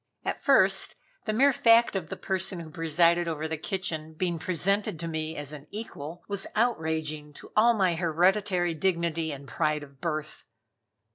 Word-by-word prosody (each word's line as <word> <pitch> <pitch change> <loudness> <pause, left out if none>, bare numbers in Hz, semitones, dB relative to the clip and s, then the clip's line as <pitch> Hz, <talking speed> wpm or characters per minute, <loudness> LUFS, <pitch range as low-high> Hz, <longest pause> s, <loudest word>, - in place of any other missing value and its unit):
At - - -2
first, - - +4 0.3
the 215 - 0
mere 270 +6 +4
fact 230 -2 +5
of 170 -5 -3
the - - -5
person 190 -1 -2
who 160 -2 -9
presided 170 +1 +2
over 160 -1 -2
the 160 - -2
kitchen 160 -2 -4
being 170 0 -1
presented 185 +1 0
to 165 - -4
me 160 0 -3
as 145 0 -6
an 150 0 -10
equal, 175 -6 -7
was 200 -1 -3
outraging 160 -9 -1
to - - -12
all 235 +2 +5
my 190 -4 +2
hereditary 175 +2 +2
dignity 165 -1 0
and 140 -1 -8
pride 150 -1 0
of 140 -2 -15
birth. 155 -3 -4
170 Hz, 165 wpm, -28 LUFS, 155-190 Hz, 0.3 s, fact